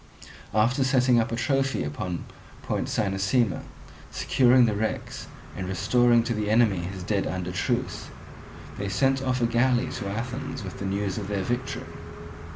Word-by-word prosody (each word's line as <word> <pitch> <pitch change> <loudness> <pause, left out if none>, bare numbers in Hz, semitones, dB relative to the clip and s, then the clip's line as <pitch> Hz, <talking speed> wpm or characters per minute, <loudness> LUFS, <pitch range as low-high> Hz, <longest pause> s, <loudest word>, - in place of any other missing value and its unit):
After 120 +5 +3
setting 130 -2 +4
up 115 - 0
a - - 0
trophy 135 +2 0
upon 85 +4 -4 0.4
Point - - -2
Cynossema, 100 +2 +1 0.5
securing 125 -1 +4
the 110 - +1
wrecks, 110 +2 -3 0.3
and 95 -1 -4
restoring 120 +5 +3
to 120 - -1
the 105 -1 -2
enemy 110 -3 +4
his 90 +1 -5
dead 100 +1 0
under 90 -1 -3
truce, 90 - -2 0.7
they 100 0 -2
sent 135 +7 +2
off 130 -2 0
a - - +5
galley 120 +1 +2
to 100 -5 -4
Athens 115 +3 -4
with 95 - -7
the 100 - -4
news 100 0 -1
of 100 - -5
their 100 -2 -1
victory. 120 +5 -3
110 Hz, 160 wpm, -26 LUFS, 95-125 Hz, 0.7 s, a